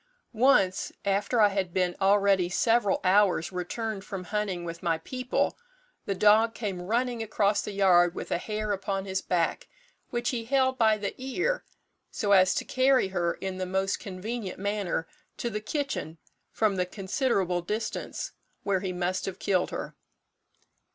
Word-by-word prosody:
"Once, 215 Hz, -6 st, +3 dB
after 200 Hz, +4 st, +1 dB
I 210 Hz, -1 st, +6 dB
had 195 Hz, -3 st, -2 dB
been 180 Hz, -1 st, +1 dB
already 195 Hz, -2 st, +4 dB
several 225 Hz, +2 st, +2 dB
hours 190 Hz, -3 st, +3 dB
returned 195 Hz, +3 st, -4 dB
from 195 Hz, -3 st, -6 dB
hunting 195 Hz, -3 st, -2 dB
with 170 Hz, 0 st, -6 dB
my 165 Hz, -2 st, +1 dB
people, 255 Hz, -, -2 dB, 0.5 s
the 195 Hz, -, 0 dB
dog 215 Hz, +3 st, +4 dB
came 195 Hz, -6 st, -3 dB
running 235 Hz, +5 st, -1 dB
across 210 Hz, -2 st, +1 dB
the -, -, -5 dB
yard 180 Hz, -3 st, +4 dB
with -, -, -6 dB
a -, -, +1 dB
hare 215 Hz, +1 st, -3 dB
upon 195 Hz, 0 st, -2 dB
his 190 Hz, 0 st, -2 dB
back, 170 Hz, -2 st, -1 dB, 0.4 s
which 240 Hz, +2 st, -1 dB
he 235 Hz, -3 st, -3 dB
held 260 Hz, 0 st, +2 dB
by 220 Hz, -2 st, +4 dB
the 200 Hz, -1 st, -3 dB
ear, 355 Hz, -, -1 dB, 0.5 s
so 205 Hz, -, -2 dB
as 185 Hz, -1 st, +6 dB
to -, -, -1 dB
carry 260 Hz, -5 st, +3 dB
her 175 Hz, -2 st, 0 dB
in 190 Hz, -1 st, -5 dB
the 185 Hz, -, -2 dB
most 190 Hz, +1 st, 0 dB
convenient 200 Hz, +1 st, -5 dB
manner 200 Hz, -4 st, -2 dB, 0.3 s
to 235 Hz, -, -3 dB
the 210 Hz, 0 st, -3 dB
kitchen 220 Hz, -, -3 dB, 0.3 s
from 210 Hz, -3 st, +1 dB
the 180 Hz, 0 st, 0 dB
considerable 190 Hz, -2 st, 0 dB
distance 210 Hz, +6 st, -4 dB, 0.3 s
where 195 Hz, -2 st, +1 dB
he 185 Hz, -1 st, -3 dB
must 180 Hz, +1 st, -2 dB
have 190 Hz, -1 st, -4 dB
killed 185 Hz, -3 st, +1 dB
her. -, -, -6 dB
200 Hz, 160 wpm, -28 LUFS, 185-225 Hz, 0.5 s, I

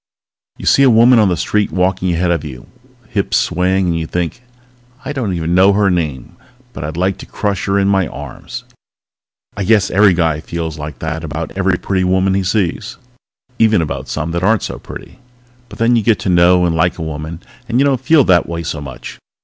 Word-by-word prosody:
_ -, -, -10 dB
_You -, -, -4 dB
see -, -, +5 dB
a 135 Hz, -, +6 dB
woman 120 Hz, +1 st, +6 dB
on 105 Hz, -3 st, +4 dB
the 90 Hz, -, 0 dB
street 105 Hz, +5 st, 0 dB
walking 95 Hz, 0 st, 0 dB
ahead 85 Hz, +1 st, 0 dB
of 85 Hz, -3 st, -1 dB
you, 65 Hz, -6 st, -9 dB, 0.4 s
hips 100 Hz, -2 st, 0 dB
swaying, 95 Hz, +2 st, +1 dB
and 85 Hz, -2 st, 0 dB
you 80 Hz, -, -4 dB
think: 90 Hz, +8 st, -3 dB, 0.6 s
I 140 Hz, -, -3 dB
don't 115 Hz, -10 st, -2 dB
even 85 Hz, 0 st, -2 dB
know 95 Hz, +2 st, +5 dB
her 100 Hz, -1 st, +2 dB
name 75 Hz, -8 st, -3 dB, 0.4 s
but -, -, -7 dB
I'd 80 Hz, +2 st, -5 dB
like 95 Hz, +2 st, 0 dB
to -, -, -10 dB
crush 100 Hz, -2 st, -2 dB
her 100 Hz, 0 st, +1 dB
in 100 Hz, 0 st, +2 dB
my 95 Hz, -3 st, +2 dB
arms!_ 70 Hz, 0 st, -8 dB, 0.9 s
_I 100 Hz, -, -3 dB
guess 105 Hz, -4 st, +3 dB
every 100 Hz, -1 st, +4 dB
guy 80 Hz, -3 st, +1 dB
feels 80 Hz, -1 st, -5 dB
like 75 Hz, +1 st, -7 dB
that 80 Hz, 0 st, -4 dB
about 80 Hz, 0 st, -5 dB
every 95 Hz, -1 st, +1 dB
pretty 95 Hz, 0 st, -1 dB
woman 95 Hz, +1 st, +2 dB
he 100 Hz, -, +1 dB
sees. 90 Hz, -2 st, -2 dB, 0.6 s
Even 110 Hz, -3 st, +4 dB
about 80 Hz, -3 st, -4 dB
some 80 Hz, -, -3 dB
that 85 Hz, +1 st, -2 dB
aren't 110 Hz, +2 st, +2 dB
so -, -, -5 dB
pretty. -, -, -11 dB, 0.5 s
But -, -, -11 dB
then 115 Hz, +1 st, +3 dB
you 115 Hz, -, +3 dB
get 110 Hz, 0 st, +2 dB
to -, -, -2 dB
know 90 Hz, 0 st, +4 dB
and 85 Hz, -2 st, 0 dB
like 85 Hz, +2 st, +1 dB
a 85 Hz, -, -5 dB
woman, 80 Hz, +1 st, -6 dB, 0.3 s
and 120 Hz, -, 0 dB
you 140 Hz, -, +4 dB
don't 135 Hz, -3 st, +1 dB
feel 145 Hz, +2 st, +4 dB
that 90 Hz, -6 st, +3 dB
way 85 Hz, 0 st, -4 dB
so 80 Hz, -2 st, -4 dB
much. 65 Hz, -3 st, -9 dB
90 Hz, 215 wpm, -16 LUFS, 80-100 Hz, 0.9 s, a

